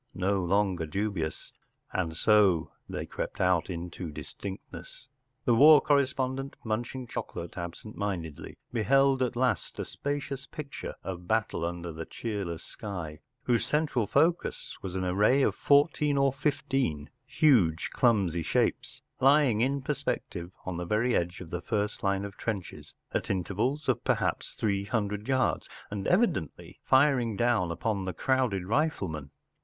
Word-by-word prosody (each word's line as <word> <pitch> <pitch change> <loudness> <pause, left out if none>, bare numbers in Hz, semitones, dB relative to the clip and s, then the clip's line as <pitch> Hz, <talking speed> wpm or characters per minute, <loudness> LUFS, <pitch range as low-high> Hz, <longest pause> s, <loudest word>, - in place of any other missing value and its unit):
no 95 +1 +1
longer 95 -2 +1
dubious, 95 -2 -3 0.4
and 80 -3 -1
so 100 -7 +4 0.2
they - - -4
crept - - -5
out 90 -2 +2
into 85 -1 -5
distinctness. 95 - -9 0.4
The 120 - +4
war 150 +5 +9
correspondent, 135 -1 0
munching 120 +3 -3
chocolate 85 -6 -6
absent 85 +5 -7
mindedly, 85 -7 -4 0.2
beheld 135 +4 +3
at 125 -1 0
last 125 +1 0
a - - -3
spacious 140 -1 -4
picture 150 -3 -7
of 90 -1 -6
battle 110 -5 0
under 85 0 -3
the 80 +1 -6
cheerless 100 -7 -4
sky, 90 -8 -6 0.2
whose 120 -2 +2
central 150 -8 0
focus 165 - +1
was 95 -1 -5
an 95 - -1
array 105 +9 +3
of - - +3
fourteen 145 0 +3
or 135 -1 +3
fifteen 135 - -1 0.2
huge 100 - +3
clumsy 100 -9 +2
shapes 125 - -1 0.2
lying 135 -4 +5
in 135 +2 +1
perspective 130 - -3
on 90 -2 -3
the 90 - -3
very 115 +7 +1
edge 85 +1 -1
of 85 - -9
the 85 - -3
first 105 +1 -2
line 100 0 0
of 100 -1 -8
trenches, 100 -6 -5 0.2
at - - -1
intervals 110 - -1
of 125 -3 +1
perhaps - - 0
three 100 -2 0
hundred 105 -1 -2
yards, 130 -1 +1 0.2
and 100 -2 -3
evidently 180 - 0
firing 130 -6 +3
down 115 -7 +2
upon 95 +3 -2
the 95 - -3
crowded 125 -3 +1
riflemen. 95 - -1
105 Hz, 140 wpm, -29 LUFS, 90-130 Hz, 0.4 s, war